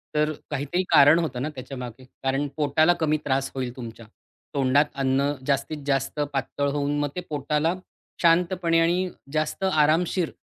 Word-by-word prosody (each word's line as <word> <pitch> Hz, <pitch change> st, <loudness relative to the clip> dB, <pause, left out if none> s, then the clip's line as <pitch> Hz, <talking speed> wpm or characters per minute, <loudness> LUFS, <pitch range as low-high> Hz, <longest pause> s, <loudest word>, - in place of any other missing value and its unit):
तर 150 Hz, 0 st, +2 dB, 0.2 s
काहीतरी 145 Hz, +6 st, -1 dB
कारण 150 Hz, +2 st, +7 dB
होतं 130 Hz, -7 st, -3 dB
ना 150 Hz, -, -2 dB
त्याच्यामागे. 130 Hz, -2 st, -8 dB, 0.2 s
कारण 135 Hz, +2 st, 0 dB
पोटाला 155 Hz, +3 st, +3 dB
कमी 155 Hz, -1 st, +2 dB
त्रास 135 Hz, -1 st, 0 dB
होईल 125 Hz, -2 st, -3 dB
तुमच्या, 115 Hz, -2 st, -9 dB, 0.5 s
तोंडात 140 Hz, +1 st, +3 dB, 0.2 s
अन्न 135 Hz, +2 st, +2 dB
जास्तीत 140 Hz, +2 st, -1 dB
जास्त 135 Hz, +1 st, -1 dB
पातळ 140 Hz, +1 st, -1 dB
होऊन 145 Hz, 0 st, -1 dB
मग 145 Hz, -1 st, 0 dB
ते 180 Hz, -, -3 dB
पोटाला 150 Hz, +3 st, 0 dB, 0.5 s
शांतपणे 170 Hz, 0 st, +3 dB
आणि 175 Hz, +2 st, +2 dB, 0.2 s
जास्त 155 Hz, +4 st, -1 dB
आरामशीर 160 Hz, +3 st, +2 dB
145 Hz, 145 wpm, -25 LUFS, 135-160 Hz, 0.5 s, कारण